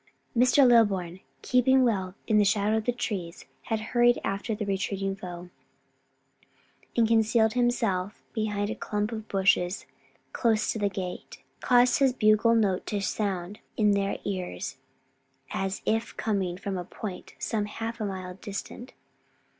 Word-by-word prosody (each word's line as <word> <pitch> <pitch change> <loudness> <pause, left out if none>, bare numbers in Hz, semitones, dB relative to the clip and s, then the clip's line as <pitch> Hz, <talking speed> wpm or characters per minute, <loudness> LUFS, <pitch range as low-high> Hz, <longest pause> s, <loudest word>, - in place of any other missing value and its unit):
Mr. 255 +3 +5
Lilburn, 195 -7 +3 0.2
keeping 260 +1 +4
well 190 -6 0
in 215 -2 +3
the - - +5
shadow 205 +2 +2
of 220 - -3
the 245 - +2
trees, 190 -8 -4 0.2
had 225 -2 -1
hurried 240 0 +4
after 200 +3 -2
the 210 0 -3
retreating 195 0 -2
foe, 180 -2 -8 1.5
and 230 -1 +4
concealing 225 0 +3
himself 225 -6 0
behind 210 -1 -1
a - - -3
clump 210 +1 -2
of 220 -1 -6
bushes 190 -1 +1 0.5
close 220 -3 +1
to 220 - -4
the 205 -1 +1
gate, 185 -2 -7 0.2
caused 245 0 +4
his 270 -2 +4
bugle 215 0 +4
note 200 -5 +1
to 205 - -1
sound 195 -1 -2 0.2
in 210 -2 +4
their 200 0 0
ears 185 -8 -4 0.7
as 195 0 -3
if 225 +1 -1
coming 195 -5 -1
from 190 0 -4
a - - -4
point 185 +1 -8
some 215 -3 -1
half 225 +2 -5
a - - 0
mile 185 -2 -5
distant. 205 +5 -7
210 Hz, 145 wpm, -27 LUFS, 195-230 Hz, 1.5 s, Mr